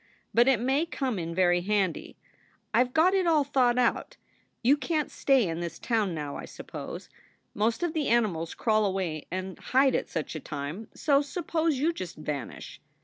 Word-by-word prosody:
But 235 +2 +5
it 265 -5 +4
may 270 +7 +1
come 260 - -2
in 165 0 -4
very 175 -1 +3
handy. 195 -2 -1 0.6
I 235 +3 +5
ve 250 - -7
got 320 +8 +4
it 380 -2 +2
all 310 -3 +4
thought 255 -3 +2
out. 245 -2 0 0.5
You 265 +5 +6
can 300 +2 0
t - - -19
stay 265 -7 +3
in 165 0 -3
this 170 -1 -5
town 215 -7 0
now, 145 -2 -4
I - - -7
suppose. - - -8 0.5
Most 225 +9 0
of 345 -2 0
the 310 -3 -1
animals 195 -9 +1
crawl 215 -2 +2
away 185 -6 -2
and 185 +1 -5
hide 265 +1 +3
at - - -1
such 160 -3 -3
a 155 - -4
time; 150 +9 -6
so 280 -2 +3
suppose 320 0 -1
you 315 +6 +1
just 180 - -6
vanish. 150 -5 -6
230 Hz, 190 wpm, -28 LUFS, 175-275 Hz, 0.6 s, You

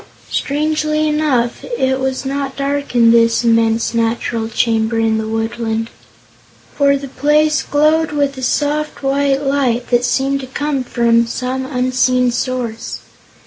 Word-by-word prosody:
Strangely 305 +1 0
enough, 295 -6 0
it 265 0 +1
was 265 0 -2
not 275 0 -3
dark 280 -1 -3
in 230 -1 +6
this 230 0 +3
immense 230 0 +2
natural 230 0 -1
chamber 225 0 0
in 225 -1 +1
the 220 - -3
woodland, 225 0 -2 0.8
for 280 -1 +3
the 275 0 -7
place 300 +3 +2
glowed 305 +2 +2
with 285 -2 0
a 260 - -8
soft, 295 +3 -1
white 275 0 +1
light 260 -4 0
that 240 0 +3
seemed 270 +2 0
to 260 - -7
come 275 0 -2
from 235 -1 +2
some 255 +2 -3
unseen 255 -1 +1
source. 240 -2 -4
260 Hz, 140 wpm, -17 LUFS, 235-285 Hz, 0.8 s, in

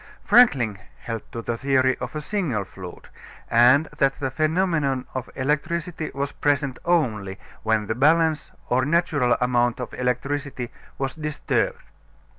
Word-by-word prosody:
Franklin 125 - +5 0.2
held 115 -2 -4
to 115 - -6
the 120 - -2
theory 130 0 +2
of 125 +4 -6
a 155 - -2
single 150 - -1
fluid, 95 -1 -10 0.4
and 125 +6 +6
that 135 -1 +3
the 135 -2 -2
phenomenon 155 -3 +1
of 130 -1 -4
electricity 155 +4 -2
was 140 +1 -2
present 140 -3 0
only 110 - 0 0.2
when 110 -1 +1
the 110 - -1
balance 155 +4 +3 0.2
or 130 +1 +2
natural 150 -4 +2
amount 120 -1 +1
of 125 - -5
electricity 125 0 -2 0.3
was 135 -1 -2
disturbed. 155 - -1
135 Hz, 135 wpm, -24 LUFS, 120-155 Hz, 0.4 s, and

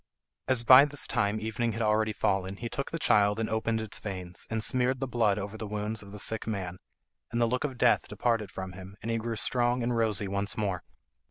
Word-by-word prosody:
As 130 -3 +2
by 130 +3 +9
this 145 -1 0
time 105 +1 0
evening 110 +1 -2
had 115 - -4
already 110 0 +2
fallen 95 -2 0
he 115 +3 -5
took 140 - -3
the 165 - -3
child 105 -7 +3
and 110 - 0
opened 110 0 0
its 110 -2 -5
veins, 90 -4 -4
and 110 -1 -1
smeared 130 +1 +1
the 135 - -2
blood 110 -5 +2
over 105 +1 -5
the 110 - -4
wounds 105 +1 -3
of 100 -1 -12
the 105 - -8
sick 110 +2 -1
man, 95 -4 -4 0.5
and 120 - -1
the 120 - +4
look 125 +2 -1
of 135 -4 -3
death 120 -1 +3
departed 115 -4 0
from 95 0 -6
him, 95 +1 -11
and 115 - -2
he 115 - 0
grew 115 +1 -3
strong 120 +2 0
and 120 0 0
rosy 110 -3 +1
once 100 +1 -2
more. 100 -5 -1
110 Hz, 230 wpm, -29 LUFS, 100-120 Hz, 0.5 s, by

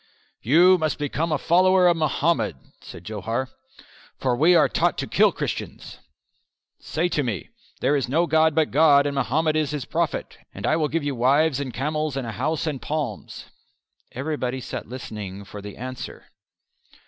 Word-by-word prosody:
"You 175 - +5
must 155 -1 -1
become 150 +3 -2
a 150 - +2
follower 185 +4 +4
of 175 - +4
Mohammed," 150 - 0 0.2
said 85 - -11
Johar, 110 +6 -3 0.7
"for 125 -2 0
we 165 +7 +5
are - - +5
taught - - 0
to - - -2
kill - - +3
Christians. - - -6 0.8
Say 165 +3 -1
to 150 - 0
me, 110 - -4 0.3
'There 145 - +2
is 135 -3 -1
no 165 +6 +2
God 160 -1 +3
but 160 -2 +2
God 145 -1 +5
and 145 - -1
Mohammed 150 +4 0
is 155 -2 +1
His 150 -4 -4
prophet' - - -2 0.2
and 100 - -5
I 155 - +2
will 155 -2 +1
give 160 +1 -2
you 145 -1 -1
wives 135 +4 +2
and 135 -3 -4
camels 150 +1 -2
and 135 - -3
a 115 - -4
house 145 +9 -2
and 150 -5 -3
palms." 145 -8 -4 0.7
Everybody 130 -2 -3
sat 125 -3 -7
listening 105 -6 -7
for 105 +1 -9
the 100 0 -9
answer. 130 +2 -7
145 Hz, 170 wpm, -24 LUFS, 125-155 Hz, 0.8 s, You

